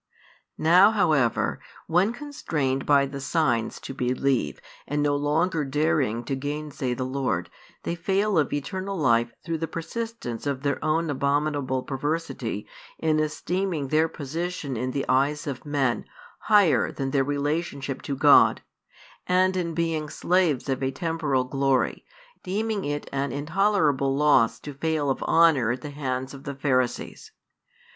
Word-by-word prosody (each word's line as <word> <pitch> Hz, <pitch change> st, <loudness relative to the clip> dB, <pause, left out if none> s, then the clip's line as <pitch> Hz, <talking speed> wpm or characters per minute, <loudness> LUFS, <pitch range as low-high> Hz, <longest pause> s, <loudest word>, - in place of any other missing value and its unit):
Now, 180 Hz, +5 st, +6 dB
however, 155 Hz, -, +1 dB, 0.3 s
when 180 Hz, +6 st, +2 dB
constrained 165 Hz, -, -3 dB
by 140 Hz, -1 st, +5 dB
the 140 Hz, 0 st, -6 dB
signs 135 Hz, -7 st, 0 dB
to -, -, -7 dB
believe 130 Hz, -, 0 dB, 0.3 s
and 145 Hz, +1 st, 0 dB
no 145 Hz, -1 st, +2 dB
longer 155 Hz, +3 st, +1 dB
daring 145 Hz, -5 st, 0 dB
to 135 Hz, +3 st, -2 dB
gainsay 145 Hz, -2 st, -3 dB
the 130 Hz, -, -3 dB
Lord, 130 Hz, -10 st, -2 dB, 0.3 s
they -, -, -2 dB
fail 190 Hz, +2 st, +1 dB
of 145 Hz, -, 0 dB
eternal 190 Hz, +7 st, -3 dB
life 120 Hz, -5 st, +2 dB
through 165 Hz, -1 st, -2 dB
the 165 Hz, -, -2 dB
persistence 170 Hz, -, -5 dB
of 140 Hz, -1 st, -2 dB
their 140 Hz, 0 st, -1 dB
own 160 Hz, 0 st, +1 dB
abominable 140 Hz, -1 st, 0 dB
perversity 150 Hz, +5 st, -3 dB, 0.3 s
in 155 Hz, -1 st, +1 dB
esteeming 155 Hz, 0 st, -2 dB
their 155 Hz, +2 st, +3 dB
position 160 Hz, -1 st, -4 dB
in 125 Hz, +3 st, -2 dB
the 135 Hz, +1 st, -2 dB
eyes 140 Hz, +4 st, +1 dB
of 140 Hz, 0 st, -6 dB
men 135 Hz, -4 st, 0 dB, 0.3 s
higher 205 Hz, -7 st, +4 dB
than 135 Hz, -1 st, -3 dB
their 135 Hz, -1 st, +2 dB
relationship 145 Hz, -1 st, -2 dB
to 140 Hz, -, -3 dB
God, 145 Hz, +1 st, +5 dB, 0.6 s
and 185 Hz, +1 st, +3 dB
in 170 Hz, -3 st, -2 dB
being 165 Hz, -3 st, -1 dB
slaves 170 Hz, -8 st, +1 dB
of 135 Hz, -1 st, -1 dB
a 130 Hz, -, +1 dB
temporal 150 Hz, -2 st, -1 dB
glory, 135 Hz, 0 st, 0 dB, 0.4 s
deeming 210 Hz, +2 st, -2 dB
it 145 Hz, 0 st, -3 dB
an 140 Hz, -1 st, -1 dB
intolerable 150 Hz, -, +1 dB
loss 145 Hz, -6 st, +4 dB
to 145 Hz, -, -7 dB
fail 150 Hz, 0 st, 0 dB
of -, -, -3 dB
honour 160 Hz, -9 st, +4 dB
at 120 Hz, +1 st, -2 dB
the 145 Hz, -, -7 dB
hands 130 Hz, -2 st, -3 dB
of 135 Hz, 0 st, -10 dB
the 140 Hz, -, -5 dB
Pharisees. 130 Hz, -3 st, -1 dB
145 Hz, 145 wpm, -25 LUFS, 135-165 Hz, 0.6 s, Now